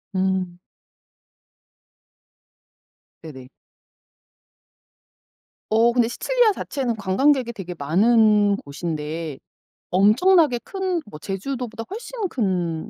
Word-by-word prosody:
음. 185 -2 -1 2.7
네네. 130 -5 -10 2.2
어 225 +2 +4
근데 240 -1 +2
시칠리아 485 - +2
자체는 260 -10 -3
관광객이 235 +6 +1
되게 185 -4 -7
많은 205 +6 +3
곳인데 155 0 -5 0.5
엄청나게 250 - +4
큰 375 -3 -2
뭐 180 -8 -11
제주도보다 225 - -5
훨씬 450 0 -5
큰 180 - -2
215 Hz, 175 characters per minute, -22 LUFS, 180-265 Hz, 2.7 s, 어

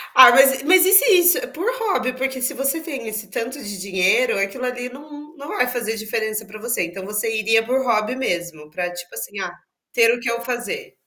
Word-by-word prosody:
Ah, 255 -2 +10
mas 270 +1 +5
e 275 - -12
mas 365 +1 +6
e 380 - +3
se 395 - +8
isso 350 +5 +4
por 360 +9 -3
hobby 255 - -1
porque 265 0 -4
se 255 +3 0
você 275 +4 -1
tem 275 -8 -7
esse 215 -2 -6
tanto 245 +7 -5
de 205 -4 -7
dinheiro, 195 +5 +1
aquilo 195 +6 -3
ali 250 0 -4
não 295 +3 -13
não 285 0 -11
vai 250 - 0
fazer 240 -3 -3
diferença 220 0 -3
pra 210 +1 -12
você. 240 -3 -1
Então, 175 +3 -7
você 210 +2 -2
iria 225 +1 +2
por 260 +3 0
hobby 225 -1 0
mesmo, 175 -10 -4
pra 175 +3 -3
tipo 175 0 -10
assim: 205 - -7
"Ah, 175 -2 -5 0.4
ter 230 -1 +4
o 245 - -3
que 235 - -2
eu 235 - -3
fazer". 250 - -5
245 Hz, 220 wpm, -20 LUFS, 215-270 Hz, 0.4 s, Ah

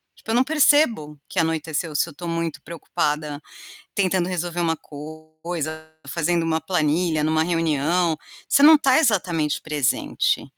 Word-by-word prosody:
Tipo, 225 - -7
eu - - +1
não 250 - +4
percebo 290 - +2
que 185 - -2
anoiteceu, 160 0 -1
se 170 - +1
eu - - -9
estou 170 +3 -7
muito 165 -1 -3
preocupada 150 -2 -3 0.5
tentando 185 -2 +1
resolver 175 -1 -3
uma 165 -1 +1
coisa, 155 +1 -7 0.2
fazendo 170 +3 0
uma 160 0 0
planilha 160 -1 0
em 150 - +1
uma 160 0 +2
reunião, 165 0 0 0.3
você 280 - +3
não 315 +2 +9
está 290 -2 +4
exatamente 175 - +1
presente. 150 -4 0
165 Hz, 145 wpm, -22 LUFS, 155-180 Hz, 0.5 s, não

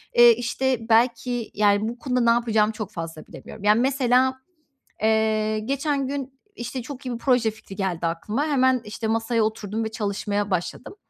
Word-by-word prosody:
eee, 240 0 +9
işte, 245 0 -2
belki, 235 +1 +1
yani, 205 +1 +2
bu 240 +1 -8
konuda 255 -3 -1
ne 235 - +3
yapacağımı 225 -2 +2
çok 215 -1 -6
fazla 165 -2 -7
bilemiyorum. 210 - -11
Yani, 210 +2 +4
mesela, 260 0 +2 0.6
eee, 215 0 +2
geçen 275 +3 -1
gün, 270 -1 -5 0.2
işte, 240 +2 -5
çok 265 +2 -9
iyi 250 - -3
bir - - -4
proje 240 -3 +2
fikri 205 -2 -12
geldi 180 -4 -2
aklıma. 210 - -2
Hemen, 260 -3 +3
işte, 210 +2 -4
masaya 225 0 +1
oturdum 220 0 -2
ve 220 - -4
çalışmaya 205 -1 -2
başladım. 180 - -3
225 Hz, 170 wpm, -24 LUFS, 215-255 Hz, 0.6 s, eee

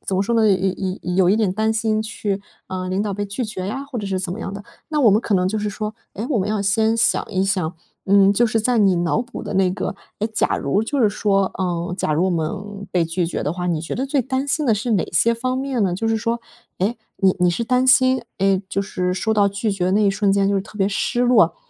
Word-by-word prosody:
怎 190 - 0
么 190 - +2
说 235 +4 -1
呢， 220 -1 +4
有 195 - +4
有 190 +1 0
有 185 0 -4
有 180 - -3
有 - - +5
一 205 - +3
点 215 -5 +1
担 220 +3 0
心 220 -1 0
去 205 -2 -3 0.3
呃， 185 -1 -4
领 190 +2 0
导 210 -1 -2
被 205 +1 -3
拒 205 +6 -3
绝 190 -4 -5
呀， 265 +7 -4
或 280 -3 -6
者 205 - -4
是 190 -1 -1
怎 185 -1 -3
么 220 - -6
样 - - -5
的。 200 0 -8 0.2
那 305 -1 -1
我 225 - +7
们 205 +2 +4
可 215 - -1
能 180 0 +2
就 215 +3 -1
是 210 0 -2
说， 215 +2 -4 0.2
哎， 220 - -4
我 255 - +2
们 195 +1 -1
要 210 -1 0
先 220 +3 +2
想 225 - +2
一 190 -2 +1
想， 185 -4 -1 0.3
嗯， 195 0 +5
就 235 +4 +3
是 225 0 0
在 240 +1 +1
你 195 -3 +4
脑 170 +5 +1
补 245 0 -8
的 - - -5
那 190 -1 +3
个 185 - -3 0.3
诶， 215 - +1
假 215 - 0
如 170 +10 0
就 280 +6 -2
是 220 - +5
说 195 -2 +1
嗯， 175 -1 -2
假 155 - -1
如 165 +4 +2
我 - - +1
们 200 +5 -4
被 175 -2 +2
拒 165 +2 -1
绝 165 - -3
的 150 - -1
话， 180 0 -4
你 170 -3 0
觉 165 - -4
得 265 +2 -2
最 275 -1 +1
担 265 +3 -2
心 305 +2 +1
的 225 - +4
是 225 +3 -2
哪 200 - +2
些 230 +8 +3
方 255 +2 -2
面 265 -4 -1
呢？ 180 - 0
就 225 +5 -2
是 225 - +2
说， 230 +1 -2 0.4
诶， 210 +6 0 0.2
你 190 -1 +3
你 180 - +4
是 175 +7 -2
担 250 +2 +2
心， 260 0 +5 0.2
嗯， 195 0 +2
就 195 - 0
是 180 -2 -2
收 220 +4 0
到 205 -1 +4
拒 200 +2 -2
绝 185 -2 0
那 210 +2 +3
一 200 - +4
瞬 195 0 +1
间 195 0 +2
就 200 - +1
是 195 - +1
特 210 - -13
别 195 0 +2
失 210 +4 -1
落。 245 0 +4
200 Hz, 300 characters per minute, -21 LUFS, 190-225 Hz, 0.4 s, 我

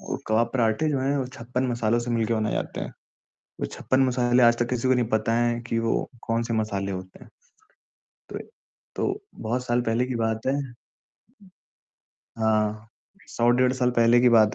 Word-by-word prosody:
वो - - -4
कबाब 115 +2 +2
पराठे 120 +4 +1
जो 140 - 0
हैं, 140 +2 0
वो 130 -2 -1
56 125 0 -3
मसालों 120 -1 +1
से 120 0 -3
मिलकर 115 -1 +1
बनाए 110 -1 0
जाते - - -3
हैं। - - -4 0.7
वो - - -1
56 130 - -1
मसाले 125 0 +2
आज 120 0 +6
तक 120 0 0
किसी 125 0 0
को 130 - +5
नहीं 125 -3 0
पता 110 0 0
हैं 120 0 +1
कि 115 -1 -2
वो 115 0 0 0.2
कौन-से 115 0 -1
मसाले 100 -3 -1
होते 95 0 -8
हैं, - - -18 1.0
तो - - -5 0.6
तो 390 - 0 0.3
बहुत 125 +3 -2
साल 120 0 +1
पहले 120 +1 0
की 130 - -3
बात 110 -1 -1
है 135 - +2 1.9
हाँ, 110 0 0 0.4
100 120 0 +1
डेढ़ 125 +1 +3
साल 125 -1 +1
पहले 115 +1 +5
की 125 - +5
बात 110 -2 +5
120 Hz, 180 wpm, -25 LUFS, 110-125 Hz, 1.9 s, आज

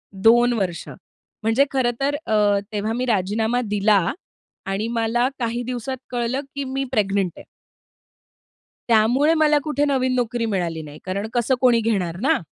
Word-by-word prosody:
2 240 +5 +4
वर्ष, 185 -6 -3 0.6
म्हणजे 225 +6 +3
खरं 260 -3 +1
तर 280 +1 0
अ, 205 -2 +3
तेव्हा 215 +1 -2
मी 250 +2 -1
राजीनामा 220 +2 0
दिला 205 -1 +3 0.7
आणि 195 +3 -2
मला 235 +1 +1
काही 235 0 -2
दिवसांत 255 +1 -4
कळलं 245 +3 -1
की 280 - -2
मी 270 +1 -3
प्रेग्नंट 200 -5 +1
आहे. - - -10 1.5
त्यामुळे 240 +8 +4
मला 300 -1 +5
कुठे 295 -1 0
नवीन 260 -2 +1
नोकरी 240 -1 -1
मिळाली 170 -4 -2
नाही 150 0 -11
कारण 200 +3 -3
कसं 245 +2 +1
कोणी 245 -2 +5
घेणार 185 -7 0
ना? 265 - +2
230 Hz, 150 wpm, -22 LUFS, 205-255 Hz, 1.5 s, मला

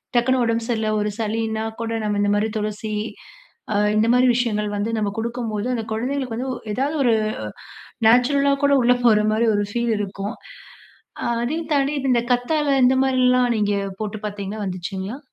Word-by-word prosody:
டக்குன்னு 255 +2 +3
உடம்பு 230 0 0
சரியில்ல, 220 -3 0
ஒரு 210 - 0
சளினா 220 0 -1 0.2
கூட 230 0 -2
நம்ம 210 -1 0
இந்த 205 0 +2
மாரி 215 +2 +1
துளசி, 215 0 -3 0.8
அ - - -1 0.2
இந்த 220 +1 +3
மாரி 250 +1 +4
விஷயங்கள் 215 -4 0
வந்து 205 +2 -1
நம்ம 205 -1 -1
கொடுக்கும்போது, 230 -2 -3
அந்த 225 -2 -3
குழந்தைகளுக்கு 250 +1 -2
வந்து, 260 +2 -3 0.2
எதாவது 280 +6 -1
ஒரு 240 -3 +4 0.7
அ - - -16 0.2
நேச்சுரலா 275 +4 +4
கூட 285 - +4
உள்ளே 245 +1 +5
போற 220 -3 +6
மாரி 225 +2 +2
ஒரு 205 - +1
ஃபீல் 235 0 0
இருக்கும். 200 +1 -4 1.1
அதே 280 +7 -1 0.2
தாண்டி 280 +1 +1 0.2
இந்த 235 - +3
கத்தாழை, 280 +3 +1
இந்த 255 +1 +4
மாதிரிலாம் 250 -1 +3
நீங்க 205 -1 +1 0.3
போட்டு 215 0 -3
பாத்தீங்களா, 205 +1 -5
வந்துச்சுங்களா? 190 +5 -5
230 Hz, 160 wpm, -22 LUFS, 210-250 Hz, 1.1 s, போற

